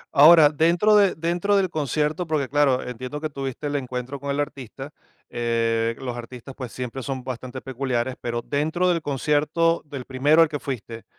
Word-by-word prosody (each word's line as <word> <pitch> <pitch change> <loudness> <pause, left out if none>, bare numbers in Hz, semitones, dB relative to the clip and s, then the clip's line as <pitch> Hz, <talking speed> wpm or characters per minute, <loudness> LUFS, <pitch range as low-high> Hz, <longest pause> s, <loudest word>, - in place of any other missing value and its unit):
Ahora, 155 +1 +8
dentro 170 +7 +3
de 200 -2 +4
dentro 175 +5 0
del 190 -3 +1
concierto, 155 +3 -1
porque 150 -4 0
claro, 140 -2 +2
entiendo 130 +4 -6
que 155 0 -4
tuviste 135 +1 -5
el 145 - -2
encuentro 130 +1 -5
con 140 +1 -6
el 140 +1 -1
artista, 135 -1 -5 0.4
eh, 115 -1 0
los 125 -2 -5
artistas, 125 +2 -9
pues, 125 -4 -7
siempre 125 +1 -5
son 130 -1 -4
bastante 130 0 -6
peculiares, 130 -1 -2
pero 120 0 -3
dentro 160 +5 0
del 170 -2 +1
concierto 150 +4 +1
del 140 -4 -7
primero 145 +5 +4
al 160 - 0
que 145 -2 -4
fuiste, 115 -4 -6
140 Hz, 175 wpm, -24 LUFS, 125-155 Hz, 0.4 s, Ahora